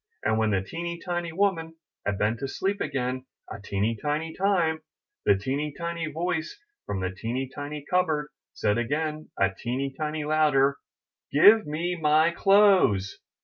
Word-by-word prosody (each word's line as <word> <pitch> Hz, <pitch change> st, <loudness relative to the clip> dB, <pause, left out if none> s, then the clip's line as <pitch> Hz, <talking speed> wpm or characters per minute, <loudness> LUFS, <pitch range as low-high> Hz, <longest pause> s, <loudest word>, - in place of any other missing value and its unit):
And 110 Hz, 0 st, +1 dB
when 110 Hz, -1 st, +2 dB
the 95 Hz, -2 st, +1 dB
teeny 170 Hz, -, -5 dB
tiny 175 Hz, -1 st, -3 dB
woman 165 Hz, -3 st, 0 dB, 0.3 s
had 100 Hz, -1 st, 0 dB
been 105 Hz, +3 st, +1 dB
to 135 Hz, -, -4 dB
sleep 195 Hz, +8 st, -2 dB
again 130 Hz, -1 st, -2 dB, 0.3 s
a 100 Hz, -, -7 dB
teeny 105 Hz, +3 st, -1 dB
tiny 150 Hz, +7 st, -2 dB
time, 175 Hz, -5 st, +1 dB, 0.5 s
the 100 Hz, -, +6 dB
teeny 140 Hz, +8 st, -2 dB
tiny 170 Hz, -1 st, -3 dB
voice 160 Hz, +1 st, -3 dB, 0.3 s
from 100 Hz, -2 st, -2 dB
the 95 Hz, 0 st, -1 dB
teeny 120 Hz, +7 st, -3 dB
tiny 145 Hz, 0 st, -6 dB
cupboard 160 Hz, -5 st, +1 dB, 0.2 s
said 105 Hz, +3 st, 0 dB
again 155 Hz, +5 st, -2 dB
a 95 Hz, -1 st, +2 dB
teeny 130 Hz, +5 st, -3 dB
tiny 155 Hz, +1 st, -3 dB
louder: 150 Hz, -3 st, +3 dB
a 140 Hz, 0 st, -11 dB
Give 210 Hz, +6 st, +7 dB
me 170 Hz, +4 st, -2 dB
my 155 Hz, 0 st, +3 dB
clothes!' 190 Hz, -, +4 dB
150 Hz, 155 wpm, -26 LUFS, 125-170 Hz, 0.5 s, Give